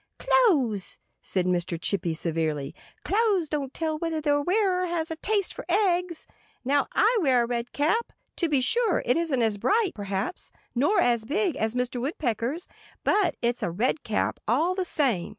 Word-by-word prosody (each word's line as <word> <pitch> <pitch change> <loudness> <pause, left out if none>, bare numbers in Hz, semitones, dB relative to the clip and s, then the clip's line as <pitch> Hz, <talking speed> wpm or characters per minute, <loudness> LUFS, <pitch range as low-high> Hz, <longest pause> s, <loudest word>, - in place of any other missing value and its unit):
"Clothes—" 295 - +2 0.2
said 185 -2 -1
little 180 -1 +2
Mr. 170 -1 -5
Chippy 175 -2 -1
severely—"clothes 165 - -1
don't 285 -3 -2
tell 315 0 -2
whether 330 -1 -2
their 290 -1 +1
wearer 365 +1 +1
has 330 -1 -2
a - - -2
taste 405 +2 -1
for - - -7
eggs. 360 -3 +1 0.4
Now, 280 +1 +2
I 445 +2 +3
wear 255 -6 +3
a - - 0
red 235 0 -3
cap. 330 +11 0 0.3
To 340 - +1
be 285 -3 +2
sure, 455 - +2
it 245 - +3
isn't 310 -7 +1
as 215 -2 +1
bright, 420 - +2
perhaps, 200 - -4 0.2
nor 290 - +2
as 235 -2 +2
big, 345 - 0
as 220 +2 -1
Mr. 250 0 -1
Woodpecker's. 265 - -2 0.4
But 410 -3 +2
it's 240 0 0
a - - 0
red 235 - 0
cap, 215 - -1
all 305 +11 +2
the 370 -1 -2
same. 260 - 0
290 Hz, 170 wpm, -26 LUFS, 230-360 Hz, 0.4 s, I